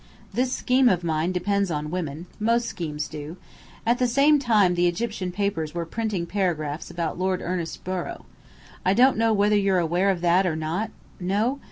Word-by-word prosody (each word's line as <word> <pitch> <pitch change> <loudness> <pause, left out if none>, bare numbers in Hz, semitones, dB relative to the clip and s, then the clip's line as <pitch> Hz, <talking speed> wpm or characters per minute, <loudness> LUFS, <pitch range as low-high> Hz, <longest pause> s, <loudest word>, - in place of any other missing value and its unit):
This 250 +4 0
scheme 255 0 +3
of 180 -4 +1
mine 160 +1 0
depends 200 +2 0
on 150 -1 -3
women. 165 -2 -4
Most 230 +2 +2
schemes 155 -8 -4
do. 150 +3 -8 0.5
At 235 +2 +2
the 250 - +3
same 280 +5 +4
time 215 -8 +3
the 175 0 +2
Egyptian 190 0 -2
papers 175 -5 -2
were 170 -1 -2
printing 210 -1 -2
paragraphs 165 -5 -2
about 170 0 -3
Lord 185 0 0
Ernest 175 -2 -4
Borrow. 185 -1 -4 0.6
I 190 +2 +3
don't 255 +3 +5
know 225 +1 +2
whether 210 0 +3
you're 195 -2 +3
aware 175 +3 +2
of 185 -3 0
that 175 +2 +3
or 165 - 0
not? 160 +7 -2 0.3
No? 210 +9 0
185 Hz, 180 wpm, -25 LUFS, 170-220 Hz, 0.6 s, don't